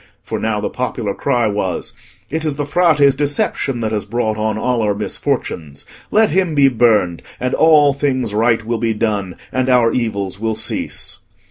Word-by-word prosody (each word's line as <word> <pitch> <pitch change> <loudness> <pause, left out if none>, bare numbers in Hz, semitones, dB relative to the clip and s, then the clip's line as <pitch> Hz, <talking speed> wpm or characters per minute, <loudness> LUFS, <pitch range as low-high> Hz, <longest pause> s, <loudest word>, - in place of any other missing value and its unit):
For - - -4
now 110 -1 -1
the 105 - -3
popular 120 -5 -3
cry 120 -1 0
was, 100 -4 -2 0.4
"It 160 +1 -2
is 155 -3 -1
the 145 0 -2
Frate's 145 -3 +4
deception 140 -3 -1
that 110 -1 -1
has 105 -2 -1
brought 110 +1 -1
on 110 0 -1
all 125 +1 0
our 105 -2 +1
misfortunes; 80 -7 -3 0.2
let 220 0 +3
him 180 -2 +1
be 140 -1 +5
burned, 110 -8 +2 0.2
and 125 +1 -2
all 150 -3 +5
things 130 -5 -1
right 115 +1 +2
will 115 0 -2
be 115 -1 0
done, 105 -5 -1 0.2
and 130 0 0
our 120 -2 +4
evils 100 -5 -2
will 110 0 -1
cease." - - -2
115 Hz, 175 wpm, -18 LUFS, 105-140 Hz, 0.4 s, be